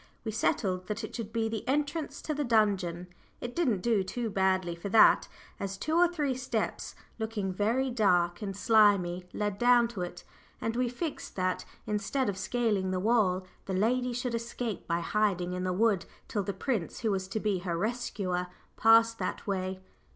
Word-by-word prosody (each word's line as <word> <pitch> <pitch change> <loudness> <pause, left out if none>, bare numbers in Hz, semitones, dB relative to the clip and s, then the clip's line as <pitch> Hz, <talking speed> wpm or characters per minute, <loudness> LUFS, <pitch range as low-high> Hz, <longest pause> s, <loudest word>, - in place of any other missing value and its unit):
We 220 - -1
settled 185 -4 0
that 215 +2 -3
it 220 - -6
should 225 -3 -5
be 225 -1 0
the 220 -1 -3
entrance 290 +1 -1
to 305 - -2
the 295 0 -1
dungeon; 200 -7 +1 0.3
it 245 0 -6
didn't 250 - +1
do 225 +1 0
badly 190 -2 +1
for 170 +4 -6
that, 220 - +6 0.3
as 195 -1 -4
two 310 +10 -1
or 350 +1 +6
three 300 -6 -1
steps, 250 -3 -3 0.2
looking 215 -4 -2
very 235 +7 +1
black 180 -6 +2
and 195 -2 -4
slimy, 200 -5 +4
led 205 -1 -2
down 240 -1 +5
to 210 -6 -6
it. 175 0 -5 0.4
And 225 0 -2
we 250 0 +1
fixed 295 +6 -5
that, 185 -1 -1 0.2
instead 210 +4 -1
of 195 - -3
"scaling 210 -4 0
the 185 0 -1
wall," 190 -3 +2 0.2
the 190 - -2
lady 245 +5 +1
should 245 0 -2
escape 230 -2 -4
by 170 0 0
hiding 180 -2 0
in 180 0 -2
the 185 - 0
wood 200 -1 +2 0.2
till 205 - -1
the 200 +1 -2
prince 200 -1 -3
who 225 -3 +1
was 190 -1 -1
to 220 - -2
be 205 -3 0
her 175 -2 -2
rescuer 195 -4 -2 0.3
passed 225 0 +5
that 185 - -3
way. 185 -1 -2
210 Hz, 180 wpm, -30 LUFS, 185-240 Hz, 0.4 s, that